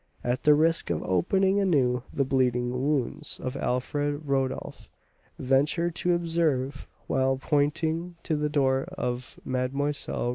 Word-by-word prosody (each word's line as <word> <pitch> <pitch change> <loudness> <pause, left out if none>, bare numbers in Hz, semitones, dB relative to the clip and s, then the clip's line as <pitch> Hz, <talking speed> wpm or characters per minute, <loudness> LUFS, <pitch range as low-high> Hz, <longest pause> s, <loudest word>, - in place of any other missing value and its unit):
At 125 +1 -1
the 150 0 +7
risk 165 +2 +2
of 85 -2 -1
opening 190 - +2
anew 135 -10 +2
the 140 - 0
bleeding 125 -2 +1
wounds 140 +3 -1
of 130 +1 -4
Alfred, 145 +4 -1
Rodolph 135 -2 -2 0.5
ventured 150 +6 +1
to 175 -1 +2
observe, 160 -6 -1 0.2
while 135 0 +1
pointing 160 +4 0
to 160 - 0
the 150 0 0
door 135 -2 +2
of 125 -6 -4
Mlle. 130 +3 -1
140 Hz, 130 wpm, -27 LUFS, 130-160 Hz, 0.5 s, the